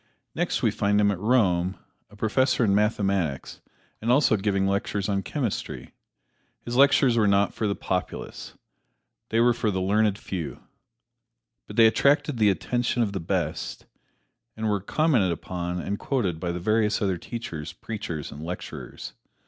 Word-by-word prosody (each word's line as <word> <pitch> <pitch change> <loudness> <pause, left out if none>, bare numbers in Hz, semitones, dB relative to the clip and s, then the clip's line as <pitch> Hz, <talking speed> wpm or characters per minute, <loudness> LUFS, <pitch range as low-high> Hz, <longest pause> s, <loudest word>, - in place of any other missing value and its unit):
Next - - -1
we - - +4
find 105 +1 +1
him 100 -1 +4
at 95 - -3
Rome, 95 -5 +2 0.3
a 105 - -16
professor 125 +4 +2
in 100 - +3
mathematics 100 -8 0 0.4
and 115 +2 +1
also 130 -3 +4
giving 100 -1 0
lectures 100 0 -1
on 100 -2 0
chemistry. 125 -2 -4 0.7
His 120 - -4
lectures 135 -2 +5
were 110 -2 +4
not 100 0 +3
for 110 - -1
the 100 - 0
populace 90 -1 -4 0.7
they 115 - +1
were 120 +1 +5
for 115 -2 -1
the 95 -2 -1
learned 105 +2 +2
few. 85 -8 -6 1.0
But - - -9
they 115 - +7
attracted 140 +3 +3
the 105 -2 +5
attention 120 +4 0
of 100 -3 -2
the 95 - -2
best, 85 -2 -3 0.7
and 110 0 -2
were 100 -2 0
commented 120 - +2
upon 90 +1 -4
and 100 +3 -3
quoted 100 - -1
by 85 0 -2
the 90 - -4
various 110 +3 +1
other 95 -5 0
teachers, 85 -11 -6
preachers 95 -9 -6
and 75 +2 -8
lecturers. 90 +2 -7
100 Hz, 155 wpm, -26 LUFS, 95-115 Hz, 1.0 s, they